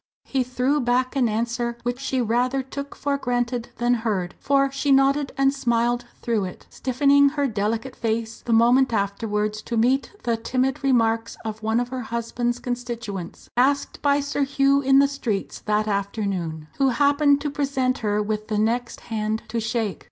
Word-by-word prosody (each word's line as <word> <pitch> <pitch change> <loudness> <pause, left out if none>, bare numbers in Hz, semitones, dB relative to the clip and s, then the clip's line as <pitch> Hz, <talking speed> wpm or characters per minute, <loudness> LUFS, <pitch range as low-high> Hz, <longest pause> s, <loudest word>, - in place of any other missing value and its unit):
He 270 - -1
threw 255 +4 0
back 255 +2 +1
an 250 -4 +2
answer 235 +2 -2
which 245 +1 -2
she 265 -1 -1
rather 250 +4 +1
took 280 +2 -7
for 280 -1 -1
granted 245 -1 -1
than 240 +1 +2
heard, 210 -7 -1
for 275 -1 +2
she 275 +1 0
nodded 275 +1 +3
and 275 0 +3
smiled 240 -2 0 0.2
through 225 -4 0
it 180 - -9
stiffening 280 +2 +3
her 285 0 -1
delicate 225 +2 -2
face 225 0 -2
the 240 - -4
moment 240 +3 +4
afterwards 210 +1 -1
to 235 - -3
meet 255 +5 +2
the 235 -1 0
timid 255 +4 -1
remarks 230 -3 +1
of 220 0 -5
one 220 +1 +1
of 245 0 -2
her 260 0 -4
husband's 235 +1 -2
constituents 235 -7 -5
asked 275 +3 +1
by 285 0 +3
Sir 285 +1 -2
Hugh 275 0 +3
in 270 0 +4
the 280 0 +6
streets 240 -8 -3
that 210 0 +1
afternoon 195 -6 -2
who 270 -1 +4
happened 285 +2 +3
to 295 -1 -2
present 270 -3 0
her 210 -1 0
with 215 0 -3
the 215 - -1
next 235 +3 -1
hand 220 -1 -2
to 230 +1 -1
shake. 220 -2 -2
240 Hz, 175 wpm, -23 LUFS, 220-270 Hz, 0.2 s, the